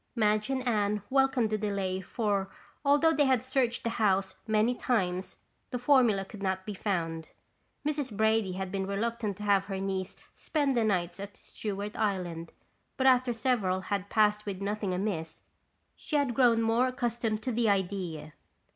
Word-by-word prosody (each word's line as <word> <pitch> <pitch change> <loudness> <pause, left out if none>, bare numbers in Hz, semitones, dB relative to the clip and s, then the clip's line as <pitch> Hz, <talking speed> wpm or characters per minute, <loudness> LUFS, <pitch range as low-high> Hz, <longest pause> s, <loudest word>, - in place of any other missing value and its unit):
Madge 215 0 +2
and 260 -1 -1
Anne 210 -3 +1
welcomed 265 -4 +3
the 215 - 0
delay 195 -3 -1
for 200 -1 -1 0.3
although 290 +3 +4
they 290 -1 +3
had 260 -3 +2
searched 255 -2 0
the 230 - -1
house 195 -2 +2
many 220 +2 +3
times, 190 -7 -1 0.3
the 250 - -2
formula 245 -6 +3
could 205 +1 -11
not 190 -1 -1
be 210 - -4
found. 165 -5 -2 0.6
Mrs. 285 -8 -2
Brady 220 -3 +2
had 190 0 -4
been 190 -1 -2
reluctant 215 0 -2
to 210 - -7
have 200 -2 +3
her 195 -1 -4
niece 190 -1 -3 0.2
spend 285 -4 0
the 235 - +3
nights 185 -4 0
at 200 0 -8
Stewart 205 0 -5
Island, 180 -6 -2 0.5
but 265 - 0
after 255 -1 +5
several 225 -6 0
had 200 0 -3
passed 210 -1 +2
with 195 -2 -3
nothing 200 0 -2
amiss, 180 -4 -3 0.5
she 305 - -5
had 285 -4 +2
grown 235 -2 +4
more 230 +3 +3
accustomed 235 -3 -2
to 255 - -1
the 230 -1 +2
idea. 180 -6 -2
210 Hz, 165 wpm, -29 LUFS, 195-240 Hz, 0.6 s, after